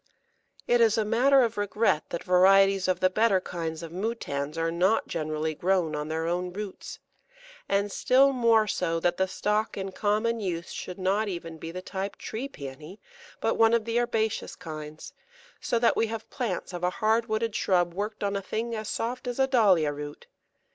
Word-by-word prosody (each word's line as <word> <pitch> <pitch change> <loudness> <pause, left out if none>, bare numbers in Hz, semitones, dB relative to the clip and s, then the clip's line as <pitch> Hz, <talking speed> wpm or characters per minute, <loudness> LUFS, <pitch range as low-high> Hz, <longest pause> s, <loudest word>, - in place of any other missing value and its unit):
] - - -45 0.2
It 240 0 +4
is 225 0 +4
a 220 - +1
matter 255 +5 +4
of 230 -2 -1
regret 205 -5 +1
that 170 - -4
varieties 195 +1 +5
of 185 -1 0
the 185 - +4
better 215 -1 +3
kinds 165 -3 -5
of 165 - -7
Moutans 165 -7 -3
are 165 0 0
not 185 +6 +2
generally 155 0 -2
grown 175 -1 0
on 150 0 -3
their 160 +1 -2
own 180 +2 -1
roots, 200 0 -7 0.7
and 200 +1 +1
still 270 +5 +4
more 230 -3 +4
so 170 -5 -1
that 175 +1 0
the 190 - +1
stock 210 +3 -1
in 195 -1 -4
common 215 +4 0
use 170 -5 -4
should 180 - -6
not 195 +3 +1
even 165 -4 -6
be 165 - -6
the 185 +1 -7
type 195 +1 -4
Tree 250 +6 -5
Pæony, 150 - -9 0.4
but - - 0
one 225 0 +6
of 225 -2 0
the 230 +1 +1
herbaceous 220 -2 -1
kinds, 155 -1 -8 0.5
so 235 - 0
that 230 0 +3
we 225 - +1
have 225 0 -6
plants 225 -8 -3
of 175 0 -6
a 180 - +3
hard 225 +3 +1
wooded 220 0 -1
shrub 175 -2 +1
worked 210 +3 -4
on 200 0 0
a 200 - -1
thing 225 +4 -3
as 215 -1 -4
soft 245 +2 -3
as 245 - -3
a 265 - +4
Dahlia 195 - +3
root. 145 0 -8
195 Hz, 195 wpm, -27 LUFS, 170-225 Hz, 0.7 s, one